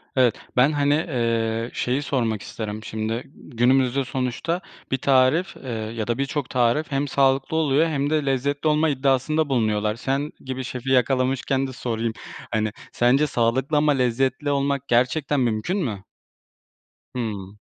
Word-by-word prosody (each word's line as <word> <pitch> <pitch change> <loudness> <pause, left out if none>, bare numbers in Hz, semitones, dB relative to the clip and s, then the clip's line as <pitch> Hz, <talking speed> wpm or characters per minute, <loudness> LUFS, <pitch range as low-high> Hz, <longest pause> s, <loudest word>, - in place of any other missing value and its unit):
evet 125 -5 +4 0.2
ben, 135 +5 +5
hani, 145 -1 +2
eee, 115 -6 -1
şeyi 125 +3 0
sormak 115 -7 -1
isterim 110 -1 -6
şimdi, 110 +3 -3
günümüzde 130 +1 +1
sonuçta 135 +8 -2 0.3
bir 130 - +2
tarif, 135 +7 +3
eee, 130 - -9
ya 110 0 -4
da 120 - 0
birçok 140 0 -2
tarif 125 +5 +1
hem 140 +1 0
sağlıklı 135 +4 +2
oluyor 155 +1 +3
hem 145 -2 -1
de 155 -2 +1
lezzetli 140 +3 0
olma 155 +1 +3
iddiasında 140 +2 +1
bulunuyorlar. 110 -4 +1
Sen 135 +4 -2
gibi 130 0 -5
şefi 125 +1 -5
yakalamışken 130 +1 +1
de 130 - -8
sorayım, 115 -2 -2 0.4
hani, 110 -1 0 0.2
sence 130 +5 +3
sağlıklı 130 +4 +1
ama 150 0 +4
lezzetli 135 +2 0
olmak 140 -1 0
gerçekten 130 +4 +2
mümkün 120 - 0
mü? 110 - -3 1.1
Hımm. 105 -4 -4
130 Hz, 140 wpm, -23 LUFS, 115-140 Hz, 1.1 s, ben